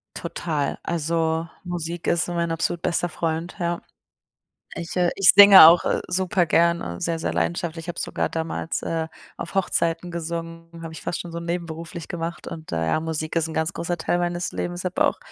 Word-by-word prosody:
Total. 150 Hz, -4 st, -3 dB
Also, 165 Hz, 0 st, -1 dB, 0.2 s
Musik 175 Hz, -1 st, -5 dB
ist 170 Hz, -, +2 dB
mein 170 Hz, -1 st, -1 dB
absolut 165 Hz, +1 st, -1 dB
bester 175 Hz, 0 st, 0 dB
Freund, 165 Hz, +2 st, -3 dB
ja. 170 Hz, -1 st, -1 dB, 0.9 s
Ich, 170 Hz, +1 st, -6 dB
äh 175 Hz, -1 st, +3 dB
ich 190 Hz, -4 st, +7 dB
singe 200 Hz, -4 st, +11 dB
auch, 165 Hz, +1 st, +6 dB
äh, -, -, +1 dB
super 185 Hz, 0 st, +1 dB
gerne 165 Hz, -, +1 dB
sehr, 165 Hz, -1 st, -1 dB
sehr -, -, -2 dB
leidenschaftlich. 85 Hz, -, -2 dB
Ich -, -, -13 dB
habe 175 Hz, -, -5 dB
sogar -, -, -1 dB
damals, 165 Hz, 0 st, -3 dB
äh, 160 Hz, -1 st, -2 dB, 0.3 s
auf 170 Hz, -, -7 dB
Hochzeiten 170 Hz, -2 st, 0 dB
gesungen, 165 Hz, 0 st, -5 dB
habe 165 Hz, -1 st, -7 dB
ich 160 Hz, -, -9 dB
fast -, -, -3 dB
schon 175 Hz, -, -7 dB
so 170 Hz, -, -4 dB
nebenberuflich 170 Hz, -1 st, -5 dB
gemacht 170 Hz, 0 st, -5 dB
und, 160 Hz, -1 st, -8 dB
äh, 80 Hz, 0 st, -1 dB
ja, 80 Hz, -, +1 dB
Musik 160 Hz, 0 st, -4 dB
ist 165 Hz, -1 st, +1 dB
'n 160 Hz, -, -7 dB
ganz 160 Hz, +1 st, 0 dB
großer 170 Hz, +1 st, -3 dB
Teil 175 Hz, -, 0 dB
meines 175 Hz, 0 st, -2 dB
Lebens. 175 Hz, 0 st, -4 dB
Ich -, -, -20 dB
habe 185 Hz, -, +1 dB
auch -, -, +1 dB
170 Hz, 190 wpm, -23 LUFS, 160-175 Hz, 0.9 s, singe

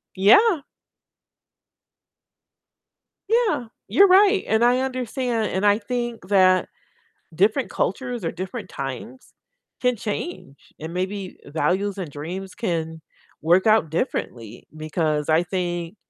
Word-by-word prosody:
Yeah. 295 Hz, -, +5 dB, 2.7 s
Yeah, 445 Hz, -, +1 dB, 0.2 s
you're 375 Hz, -, +6 dB
right, 390 Hz, +1 st, +5 dB
and 220 Hz, +2 st, +3 dB
I 250 Hz, +1 st, +3 dB
understand, 250 Hz, -4 st, -2 dB
and 190 Hz, +2 st, 0 dB
I 205 Hz, +1 st, +4 dB
think 235 Hz, -3 st, -4 dB
that 185 Hz, -2 st, +4 dB, 0.7 s
different 215 Hz, -, +2 dB
cultures, 245 Hz, 0 st, -2 dB
or -, -, -1 dB
different 185 Hz, +2 st, -6 dB
times 140 Hz, -, -7 dB, 0.5 s
can 250 Hz, -1 st, +2 dB
change, 210 Hz, -, -6 dB
and 160 Hz, +2 st, -7 dB
maybe 190 Hz, +1 st, -4 dB
values 190 Hz, +6 st, -1 dB
and 165 Hz, -6 st, -5 dB
dreams 180 Hz, +6 st, -7 dB
can 160 Hz, -7 st, -3 dB, 0.4 s
work 175 Hz, +6 st, +3 dB
out 215 Hz, -7 st, +4 dB
differently. 120 Hz, -, -4 dB
Because 155 Hz, -1 st, -2 dB
I 160 Hz, +2 st, +4 dB
think 175 Hz, 0 st, -3 dB
195 Hz, 110 wpm, -23 LUFS, 170-245 Hz, 2.7 s, you're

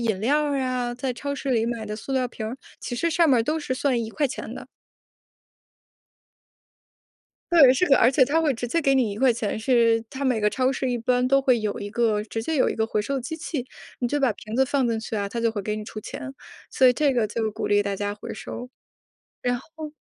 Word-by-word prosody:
饮 220 Hz, -5 st, 0 dB
料 295 Hz, +6 st, +2 dB
儿 285 Hz, -1 st, 0 dB
呀， 250 Hz, -2 st, -1 dB
在 250 Hz, +1 st, -3 dB
超 280 Hz, +3 st, -4 dB
市 275 Hz, -1 st, -4 dB
里 230 Hz, -2 st, +2 dB
买 230 Hz, -2 st, -3 dB
的 210 Hz, 0 st, -5 dB
塑 245 Hz, +5 st, -6 dB
料 255 Hz, -1 st, +1 dB
瓶 220 Hz, -2 st, -6 dB
儿， 240 Hz, +4 st, -5 dB, 0.2 s
其 245 Hz, -, -5 dB
实 335 Hz, +6 st, 0 dB
上 330 Hz, 0 st, +3 dB
面 255 Hz, -3 st, +5 dB
儿 -, -, +2 dB
都 305 Hz, +7 st, -1 dB
是 260 Hz, -3 st, -2 dB
算 255 Hz, -3 st, 0 dB
￥1 260 Hz, +4 st, -3 dB
的。 -, -, -9 dB, 2.9 s
对， 280 Hz, -7 st, +8 dB
是 350 Hz, +7 st, +1 dB
的。 275 Hz, -, +6 dB
而 240 Hz, -, +5 dB
且 260 Hz, -1 st, +4 dB
它 320 Hz, +5 st, +2 dB
会 295 Hz, -4 st, +2 dB
直 240 Hz, +1 st, -4 dB
接 335 Hz, +7 st, 0 dB
给 275 Hz, -1 st, +3 dB
你 250 Hz, -5 st, +2 dB
￥1， 230 Hz, -1 st, +1 dB
是 230 Hz, -1 st, +3 dB
它 275 Hz, +1 st, -4 dB
每 245 Hz, -5 st, +1 dB
个 210 Hz, -, +3 dB
超 255 Hz, +2 st, +1 dB
市 265 Hz, -1 st, -1 dB
一 245 Hz, -, 0 dB
般 250 Hz, +2 st, +1 dB
都 275 Hz, +1 st, +4 dB
会 255 Hz, -3 st, +3 dB
有 210 Hz, -1 st, -3 dB
一 205 Hz, -, -5 dB
个 220 Hz, -1 st, +1 dB
直 225 Hz, +1 st, -4 dB
接 320 Hz, +3 st, -1 dB
有 -, -, +3 dB
一 -, -, -3 dB
个 220 Hz, -, +1 dB
回 215 Hz, -2 st, -1 dB
收 275 Hz, +6 st, -3 dB
的 260 Hz, -, -2 dB
机 320 Hz, +6 st, -5 dB
器。 290 Hz, -5 st, -4 dB, 0.3 s
你 245 Hz, -, 0 dB
就 290 Hz, +3 st, -1 dB
把 265 Hz, -5 st, +2 dB
瓶 215 Hz, +1 st, -10 dB
子 265 Hz, +1 st, +4 dB
放 270 Hz, -1 st, +1 dB
进 225 Hz, -1 st, 0 dB
去 220 Hz, -, -5 dB
啊， 200 Hz, -1 st, -2 dB
它 235 Hz, -, -4 dB
就 230 Hz, 0 st, +2 dB
会 210 Hz, -2 st, -4 dB
给 210 Hz, +2 st, -2 dB
你 215 Hz, -, -5 dB
出 -, -, -10 dB
钱。 275 Hz, +3 st, -7 dB, 0.4 s
所 260 Hz, -, +3 dB
以 250 Hz, -, +8 dB
这 285 Hz, 0 st, +1 dB
个 235 Hz, -3 st, +2 dB
就 220 Hz, +1 st, -2 dB
鼓 -, -, -4 dB
励 205 Hz, 0 st, +3 dB
大 200 Hz, -1 st, -2 dB
家 205 Hz, +1 st, -2 dB
回 210 Hz, -, -8 dB
收。 250 Hz, +1 st, -7 dB, 0.7 s
然 245 Hz, 0 st, 0 dB
后 310 Hz, +3 st, -10 dB
245 Hz, 255 characters per minute, -24 LUFS, 225-275 Hz, 2.9 s, 对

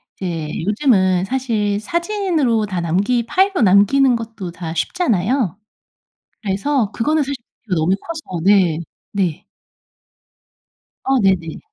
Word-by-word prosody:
이제 170 Hz, -5 st, -4 dB, 0.2 s
요즘은 195 Hz, -5 st, +2 dB
사실 215 Hz, -4 st, -1 dB
사진으로 335 Hz, -, 0 dB
다 185 Hz, -4 st, -3 dB
남기 200 Hz, +9 st, +1 dB
파일로 385 Hz, +4 st, +2 dB
남기는 225 Hz, +6 st, +5 dB
것도 225 Hz, -5 st, -6 dB
다 165 Hz, -1 st, -6 dB
쉽잖아요. 215 Hz, -, 0 dB, 0.8 s
그래서 210 Hz, +3 st, 0 dB
그거는 300 Hz, +6 st, +1 dB
사실 280 Hz, +1 st, -3 dB, 0.3 s
부피가 190 Hz, -5 st, -1 dB
너무 165 Hz, +4 st, +2 dB
커서 310 Hz, -, -6 dB
네. 190 Hz, -5 st, +4 dB, 0.3 s
네. 190 Hz, -1 st, -2 dB, 1.6 s
아 270 Hz, 0 st, +3 dB
네네. 185 Hz, -5 st, +1 dB
210 Hz, 240 characters per minute, -19 LUFS, 185-265 Hz, 1.6 s, 남기는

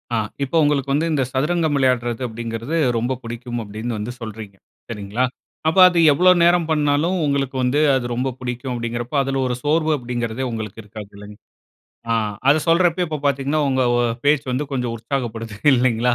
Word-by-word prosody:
அ -, -, +1 dB, 0.3 s
இப்ப 140 Hz, +5 st, -4 dB
உங்களுக்கு 140 Hz, -2 st, +1 dB
வந்து 155 Hz, +3 st, +1 dB
இந்த 140 Hz, -3 st, +1 dB
சதுரங்கம் 155 Hz, +3 st, 0 dB
விளையாடுறது 125 Hz, -2 st, +1 dB
அப்டீங்கிறது, 115 Hz, +5 st, -5 dB, 0.2 s
ரொம்ப 120 Hz, +3 st, -1 dB
பிடிக்கும் 120 Hz, +1 st, -5 dB
அப்டீன்னு 110 Hz, +3 st, -5 dB
வந்து 105 Hz, +3 st, -4 dB
சொல்றீங்க. 110 Hz, -3 st, -8 dB, 0.3 s
சரிங்களா? 105 Hz, +2 st, -3 dB, 0.4 s
அப்ப 160 Hz, -, +1 dB
அது 175 Hz, -2 st, +1 dB
எவ்ளோ 180 Hz, +6 st, +5 dB
நேரம் 175 Hz, -1 st, +3 dB
பண்ணாலும் 150 Hz, +4 st, +1 dB
உங்களுக்கு 140 Hz, -2 st, -1 dB
வந்து, 125 Hz, +4 st, +1 dB, 0.2 s
அது 125 Hz, -2 st, -1 dB
ரொம்ப 125 Hz, +3 st, -1 dB
பிடிக்கும் 125 Hz, +1 st, -4 dB
அப்டீங்கின்றப்ப 120 Hz, +3 st, -3 dB
அதுல 135 Hz, 0 st, -2 dB
ஒரு 125 Hz, -, -1 dB
சோர்வு 155 Hz, +1 st, +2 dB
அப்டீங்கிறதே 120 Hz, 0 st, -3 dB
உங்களுக்கு 110 Hz, -2 st, -6 dB
இருக்காது, 105 Hz, -1 st, -10 dB
இல்ல 105 Hz, 0 st, -11 dB, 0.9 s
அ -, -, +3 dB, 0.3 s
அத 145 Hz, -, +6 dB
சொல்றப்பயே, 175 Hz, +1 st, +3 dB
இப்ப 155 Hz, -1 st, -3 dB
பார்த்தீங்கன்னா, 140 Hz, +2 st, 0 dB
உங்க 130 Hz, -1 st, +1 dB, 0.2 s
அ -, -, +2 dB, 0.2 s
பேச்சு 145 Hz, -1 st, +2 dB
வந்து 140 Hz, +4 st, -1 dB
கொஞ்சம் 125 Hz, -3 st, -2 dB
உற்சாகப்படுது, 115 Hz, -2 st, -4 dB, 0.2 s
இல்லைங்களா? 120 Hz, -1 st, +2 dB
130 Hz, 165 wpm, -21 LUFS, 115-145 Hz, 0.9 s, அத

